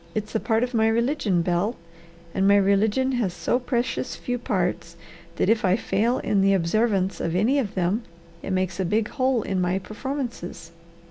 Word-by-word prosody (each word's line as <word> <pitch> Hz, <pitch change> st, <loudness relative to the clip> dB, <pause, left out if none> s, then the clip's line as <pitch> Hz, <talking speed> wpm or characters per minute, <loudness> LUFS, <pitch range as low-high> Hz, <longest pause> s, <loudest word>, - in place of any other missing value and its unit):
It's 215 Hz, 0 st, -3 dB
a 220 Hz, -, +1 dB
part 225 Hz, +1 st, +1 dB
of 250 Hz, 0 st, -3 dB
my 220 Hz, -1 st, +3 dB
religion, 225 Hz, -, +1 dB
Bel. 180 Hz, +7 st, 0 dB, 0.6 s
And 195 Hz, 0 st, +2 dB
my 200 Hz, -, +6 dB
religion 205 Hz, +6 st, +2 dB
has 225 Hz, -8 st, -1 dB
so 180 Hz, +8 st, 0 dB
precious 250 Hz, 0 st, -2 dB
few 245 Hz, 0 st, -3 dB
parts -, -, -2 dB, 0.4 s
that -, -, 0 dB
if 225 Hz, 0 st, +2 dB
I 185 Hz, -1 st, +4 dB
fail 225 Hz, +3 st, 0 dB
in 200 Hz, -2 st, +1 dB
the 195 Hz, 0 st, +4 dB
observance 195 Hz, +2 st, +1 dB
of 165 Hz, 0 st, -2 dB
any 235 Hz, +10 st, +3 dB
of 215 Hz, -7 st, -3 dB
them 185 Hz, +5 st, +1 dB, 0.4 s
it -, -, -6 dB
makes 185 Hz, -1 st, -1 dB
a -, -, +1 dB
big 210 Hz, +4 st, 0 dB
hole 260 Hz, -4 st, +1 dB
in 190 Hz, -1 st, -1 dB
my 180 Hz, +1 st, +1 dB
performances. 215 Hz, -, -5 dB
210 Hz, 185 wpm, -24 LUFS, 185-240 Hz, 0.6 s, my